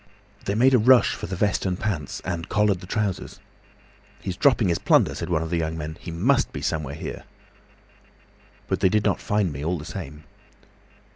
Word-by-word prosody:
They 100 - -1
made 130 +4 +4
a 125 - +6
rush 125 +3 +5
for - - -6
the 95 - -4
vest 100 +1 +1
and 90 -2 -1
pants, 90 -10 -3
and 85 -2 -4
collared 105 -3 +2
the 90 - -11
trousers. 105 -2 -2 0.8
'He's 95 -2 -4
dropping 125 -5 +3
his 85 - +1
plunder,' - - +3
said 85 - -5
one 80 -2 +1
of 80 - -6
the 85 - +1
young 80 0 -2
men. 80 0 -5
'He - - -8
must 100 +12 +1
be - - -6
somewhere 75 -2 -2
here.' - - -7 1.4
"But - - -1
they 95 - +4
did 105 +1 +1
not - - +1
find 105 -6 0
me 70 +1 -6
all 85 +3 0
the 75 - -8
same. 80 -3 -7
90 Hz, 200 wpm, -24 LUFS, 80-105 Hz, 1.4 s, a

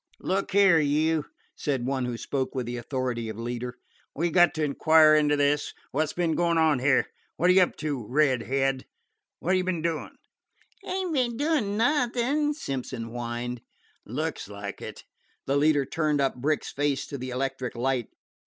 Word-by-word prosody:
"Look 195 +1 -1
here, 195 -4 +6
you," 155 +1 +1 0.3
said 135 -4 -2
one 130 -1 -1
who 120 -1 -3
spoke 135 +2 -3
with 130 -2 -2
the 120 +1 -4
authority 120 -2 -3
of 110 - -6
leader, 120 +1 -4 0.4
"we 170 +3 0
've - - -10
got 175 -2 +5
to 155 - -1
inquire 155 +2 +5
into 150 -1 +4
this. 145 +1 +1 0.2
Wot 155 +2 +1
's - - -6
be'n 170 -2 0
goin' 170 0 +1
on 160 -4 +3
here? 130 +1 +3 0.3
Wot 180 - +3
're - - +5
you 190 - +6
up 180 - +2
to, 145 -8 -4
Red 135 -2 +3
head? 135 +1 -1 0.5
Wot 185 +3 +2
you 185 - +1
be'n 180 -3 -2
doin'?" 165 -2 -3 0.7
"Ain't 370 -3 -2
be'n 245 -5 0
doin' 280 -9 0
nothin'," 270 +3 +1
Simpson 130 - -4
whined. 120 0 -4 0.4
"Looks 155 +4 -4
like 100 -1 -7
it." - - -8 0.4
The 135 - 0
leader 145 -1 +3
turned 155 -1 0
up 135 -1 +2
Brick's 145 +5 -1
face 140 -2 0
to 140 - -7
the 130 +1 -5
electric 130 0 -3
light. 125 -1 0
145 Hz, 180 wpm, -27 LUFS, 130-170 Hz, 0.7 s, here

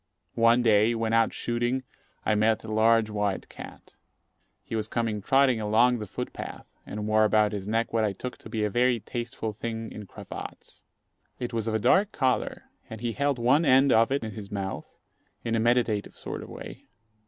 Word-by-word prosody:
One 115 +1 +5
day, 110 0 +4
when 115 0 -1
out 115 -1 +4
shooting, 120 +2 -1 0.4
I - - +3
met 110 +1 +2
a 110 - -6
large 110 0 +3
white 105 -2 -1
cat. - - -12 0.7
He - - -5
was 110 -1 -1
coming 110 -2 -2
trotting 130 0 +3
along 115 +3 +3
the 105 - -6
foot - - -5
path, - - -7 0.2
and 105 0 -5
wore 110 0 +4
about 105 -1 +3
his 100 -2 -5
neck 115 +2 0
what 115 -1 +2
I 105 - +1
took 125 +6 -7
to - - -11
be 110 -2 -2
a 105 - +1
very 120 +2 +2
tasteful 115 -1 -5
thing 115 +1 -5
in 105 -2 -9
cravats. - - -10 0.5
It 125 -1 -5
was 115 -1 -2
of 110 - 0
a - - +1
dark 195 - +3
colour, 130 -7 0 0.3
and 110 - -7
he 120 -1 -1
held 140 +2 0
one 130 +7 +3
end 135 -1 +5
of 115 +3 +4
it 140 -2 0
in 110 - -4
his 100 -1 -8
mouth 100 -2 -5 0.5
in 115 - -2
a 115 - +2
meditative 115 -3 +1
sort - - -6
of - - -10
way. - - -10
115 Hz, 200 wpm, -27 LUFS, 110-120 Hz, 0.7 s, One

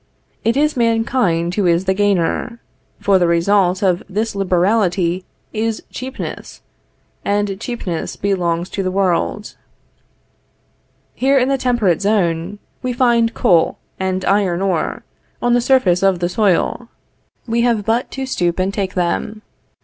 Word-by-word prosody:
It 230 +3 +1
is 300 +1 +2
mankind 225 -7 +1
who 195 -2 +1
is 170 +2 +2
the 190 - +2
gainer; 205 +4 0 0.4
for 195 -2 +3
the 175 - +3
result 185 +3 +2
of 180 -2 +2
this 215 +3 -2
liberality 185 -1 +1 0.3
is 220 0 -2
cheapness, 260 +2 -7 0.6
and 205 -1 -1
cheapness 200 -10 -4
belongs 175 -3 -1
to 195 - -2
the 185 - -1
world. 195 +2 -1 1.6
Here 275 +2 +2
in 260 0 +2
the 275 - +2
temperate 235 -10 +1
zone, 195 -2 0 0.2
we 255 -1 -2
find 235 -2 +2
coal 170 -3 +3 0.2
and 190 0 -1
iron 195 -3 +2
ore, 180 -5 -1 0.4
on 240 0 +1
the 245 - +3
surface 235 -9 +3
of 195 -2 +3
the 175 0 -1
soil; 215 +3 0 0.6
we 235 0 0
have 230 -4 +1
but 230 +3 0
to 270 0 -4
stoop 175 -9 -1
and 190 +1 0
take 195 -3 -3
them. 200 +4 -2
200 Hz, 140 wpm, -18 LUFS, 180-230 Hz, 1.6 s, for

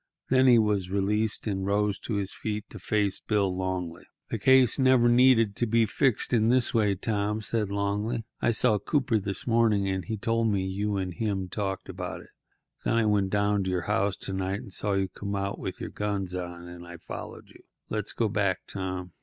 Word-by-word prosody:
Then 130 0 +4
he 120 -2 +7
was 105 -4 +1
released, 105 +3 0
and 95 -3 -2
rose 100 0 0
to 110 - -4
his 100 -1 -2
feet 105 0 -4
to - - -8
face 105 -3 0
Bill 100 -4 0
Longley. 90 -2 -3 0.3
"The 115 - -2
case 130 +2 +5
never 130 -2 +5
needed 120 -4 +5
to 120 - +1
be 115 +1 +3
fixed 125 +3 0
up 115 - +4
this 125 -1 +2
way, 105 -3 +2
Tom," 105 +1 -1
said 110 -1 -1
Longley. 105 +4 -1 0.2
"I - - +2
saw 110 -2 +3
Cooper 125 -1 +1
this 100 -1 -4
evening, 115 -4 +3
and 95 -1 -1
he 110 -1 -4
told 115 +2 0
me 100 -2 0
what 95 - -3
you 105 +1 -1
and 95 -2 -3
him 95 -3 -2
talked 95 0 -3
about. - - -6 0.6
Then - - +1
I 115 -1 +3
went 100 -2 +2
down 100 0 +1
to - - -1
your 90 -1 0
house 100 -2 0
to 95 - -5
night 95 +1 -2
and 95 - -11
saw 100 0 0
you 95 -1 +1
come 100 +2 -5
out 100 0 -3
with - - -5
your - - -6
guns 100 -3 -2
on, 90 -1 -6
and 85 0 -10
I 85 0 -9
followed - - -9
you. - - -17 0.3
Let's 105 - -2
go 115 - +1
back, 100 -3 0
Tom." 95 -2 -5
100 Hz, 210 wpm, -27 LUFS, 95-110 Hz, 0.6 s, he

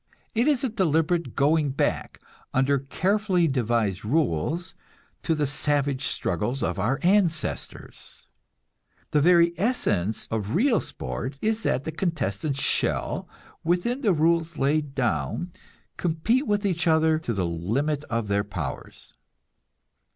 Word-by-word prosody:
It 235 +5 +2
is 285 -4 +2
a 260 - +1
deliberate 170 -4 0
going 150 +1 +3
back, 135 - -1 0.4
under 135 +1 +3
carefully 185 +5 +1
devised 115 - 0
rules, 155 - 0 0.5
to 165 - 0
the 150 -1 0
savage 145 -1 0
struggles 115 +9 -1
of 90 -3 -1
our 115 +7 +1
ancestors. 175 -4 -1 0.9
The 150 - +3
very 170 +1 +5
essence 110 - 0
of 110 -1 -2
real 235 +3 +3
sport 115 - -5
is 220 +4 0
that 130 - 0
the 160 - -4
contestants 150 - -2
shall, - - 0 0.3
within 180 +11 0
the 215 - +3
rules 165 0 +1
laid 145 0 0
down, 120 - -1 0.5
compete 180 - 0
with 205 0 +1
each 175 -4 0
other 160 -1 +3
to 160 - -4
the 95 -5 -1
limit 120 - -1
of 115 -1 -2
their 100 0 +1
powers. 105 - -7
155 Hz, 130 wpm, -25 LUFS, 120-175 Hz, 0.9 s, very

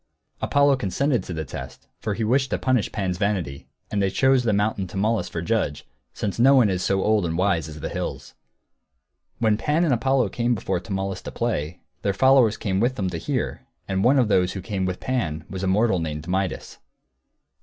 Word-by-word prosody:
Apollo 140 -1 +3
consented 125 +3 0
to - - -8
the 80 -2 -3
test, 65 0 -9
for 105 -2 -2
he 115 - -2
wished 130 +4 +2
to - - 0
punish 130 -4 +1
Pan's 95 -4 -2
vanity, 90 -9 -2 0.2
and 100 - 0
they 100 - +2
chose 130 +5 +3
the 120 -3 +1
mountain 105 -1 0
Tmolus 105 -1 -1
for 85 - -4
judge, 95 -8 -1 0.3
since 105 +1 -4
no 135 +3 +6
one 120 -7 +5
is 90 -1 -1
so 95 +1 +1
old 110 -2 +2
and 80 -1 -2
wise 90 -4 +1
as 75 -1 -9
the - - -3
hills. - - -5 1.0
When 110 -2 +2
Pan 150 +9 +1
and 150 - +2
Apollo 125 -1 +2
came 120 +2 0
before 95 -3 -2
Tmolus, 95 0 -4
to - - -7
play, 90 -8 -2 0.2
their 100 - 0
followers 130 -2 +4
came 95 -3 -1
with 120 +4 +1
them, 95 -5 -2
to 85 - -4
hear, - - -3 0.2
and 95 0 0
one 135 +3 +5
of 125 -4 +3
those 90 -3 +2
who 95 - -5
came 95 -3 -2
with 90 -1 -3
Pan 85 -12 -2
was 95 -1 -4
a 95 - -1
mortal 100 0 +2
named 75 -1 -4
Midas. 95 -1 -2
100 Hz, 205 wpm, -24 LUFS, 90-120 Hz, 1.0 s, no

